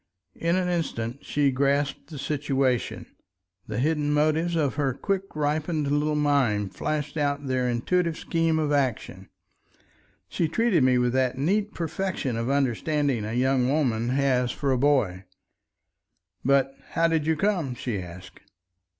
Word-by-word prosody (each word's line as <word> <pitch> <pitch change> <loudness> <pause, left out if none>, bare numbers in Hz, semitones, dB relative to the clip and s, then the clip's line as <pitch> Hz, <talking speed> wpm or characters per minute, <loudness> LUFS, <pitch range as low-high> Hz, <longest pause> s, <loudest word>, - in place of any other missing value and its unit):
In 170 +1 0
an 185 -1 0
instant 140 -8 -3
she 145 -2 +1
grasped 140 +1 0
the 155 - -8
situation. 135 -3 -1 0.6
The 105 - -4
hidden 150 +2 +1
motives 155 +3 +1
of 150 -5 +1
her 140 -3 -1
quick 195 +3 -3
ripened 150 0 -1
little 150 +1 +1
mind 130 -10 +1
flashed 150 0 -3
out 145 -1 -1
their 130 -1 0
intuitive 165 +8 0
scheme 165 -1 0
of 155 -2 0
action. 135 -5 -1 1.0
She 165 - -1
treated 210 - +2
me 130 -1 +4
with 125 0 +1
that 130 -1 +1
neat 200 +9 0
perfection 165 -5 -2
of 115 +2 -2
understanding 140 -2 0
a 110 - -4
young 130 0 +2
woman 120 -6 +1
has 130 -2 +1
for 140 0 -1
a - - +3
boy. 115 -10 +1 1.2
"But 135 0 +2 0.2
how 165 - +3
did 160 -2 0
you 160 - +3
come?" 170 -8 0
she 120 -5 -3
asked. 90 +1 -11
140 Hz, 145 wpm, -26 LUFS, 125-155 Hz, 1.2 s, me